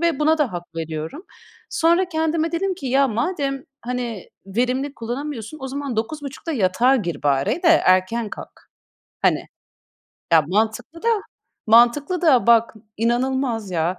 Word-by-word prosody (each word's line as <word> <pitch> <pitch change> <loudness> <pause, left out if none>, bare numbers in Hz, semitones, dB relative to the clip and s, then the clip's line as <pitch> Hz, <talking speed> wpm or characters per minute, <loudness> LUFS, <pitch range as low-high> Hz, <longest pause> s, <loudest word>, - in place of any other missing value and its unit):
ve 340 -1 +1
buna 310 +1 +3
da 290 -8 +1
hak 175 -1 -8
veriyorum. 160 - -5 0.4
Sonra 340 +3 +2
kendime 320 0 0
dedim 380 +3 0
ki, 305 -7 -7
ya 270 +2 +3
madem 275 - -2 0.2
hani 240 -5 -4 0.2
verimli 255 +7 -1
kullanamıyorsun, 245 +3 -5
o 265 - -5
zaman 275 -3 -4
21.30'da 290 +6 -4
yatağa 235 +4 +3
gir 175 -8 -4
bari 145 - +1
de 345 - +4
erken 215 - +3
kalk. - - -11 0.5
Hani! - - +2 0.9
Ya, 160 -1 +7
mantıklı 220 - -1
da, 465 - +1 0.6
mantıklı 240 +10 +4
da! 275 -9 +4
Bak, 230 -1 +4 0.2
inanılmaz 240 -1 0
ya! 175 +1 -1
250 Hz, 135 wpm, -22 LUFS, 220-305 Hz, 0.9 s, Ya